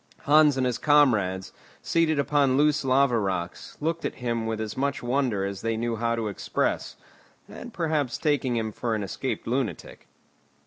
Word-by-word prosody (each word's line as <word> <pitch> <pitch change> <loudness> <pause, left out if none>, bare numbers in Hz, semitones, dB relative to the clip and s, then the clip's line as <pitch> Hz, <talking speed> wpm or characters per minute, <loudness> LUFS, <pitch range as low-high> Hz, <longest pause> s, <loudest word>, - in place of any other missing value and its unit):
Hans 150 -1 +5
and 130 - +1
his 125 -2 -1
comrades, 110 -11 +2 0.3
seated 165 -2 +1
upon 140 -2 +2
loose 150 0 +3
lava 130 -2 +3
rocks, 95 -4 -4
looked 165 +2 -2
at - - -3
him 115 -3 -2
with 110 -1 -2
as 110 -1 -4
much 140 0 -2
wonder 120 -6 0
as 100 -1 -5
they 115 -1 -1
knew 115 0 -1
how 115 +1 0
to 115 -2 -2
express, 100 - -2 0.5
and - - -9
perhaps 155 -6 -1
taking 145 -5 0
him 110 -1 -1
for 115 +1 -2
an 105 - -2
escaped 130 +7 -4
lunatic. 120 - -3
125 Hz, 170 wpm, -26 LUFS, 110-145 Hz, 0.5 s, Hans